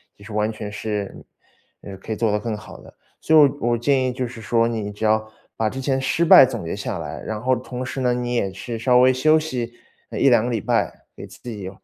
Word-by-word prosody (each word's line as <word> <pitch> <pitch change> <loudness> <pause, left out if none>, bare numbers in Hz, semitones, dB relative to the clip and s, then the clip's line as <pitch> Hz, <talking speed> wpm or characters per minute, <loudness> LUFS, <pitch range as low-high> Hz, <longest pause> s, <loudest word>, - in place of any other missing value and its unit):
也 100 - -16
是 105 - -9
完 105 +1 0
全 105 -1 -7
是， 105 -1 -4 0.7
呃， 95 - -9
可 105 - -9
以 - - 0
做 110 -1 0
得 105 - 0
更 110 0 -4
好 - - -12
的。 - - -15 0.3
所 160 - +2
以 - - +9
我 125 -4 -2
我 - - +1
建 130 +2 +2
议 - - -1
就 125 0 -3
是 115 -1 -10
说， 115 +1 +1
你 110 -3 -3
只 105 +2 -4
要 110 0 +1 0.2
把 110 -1 0
之 130 - -7
前 135 0 0
失 165 +5 +1
败 160 - +9
总 120 -8 -2
结 80 - -3
下 - - -4
来， - - -6
然 110 -1 -5
后 130 +3 +1
同 125 +1 -6
时 130 +1 -5
呢， 125 -1 +2
你 125 0 -3
也 100 -5 0
是 110 +5 -6
稍 125 +2 +3
微 130 +1 +5
休 155 +5 +4
息， 125 -6 -4 0.3
呃， - - -6
1-2 120 -5 +5
个 125 - -2
礼 115 -3 -1
拜， - - -1
给 - - -9
自 - - -16
己， 105 -6 -6
115 Hz, 270 characters per minute, -22 LUFS, 110-130 Hz, 0.7 s, 以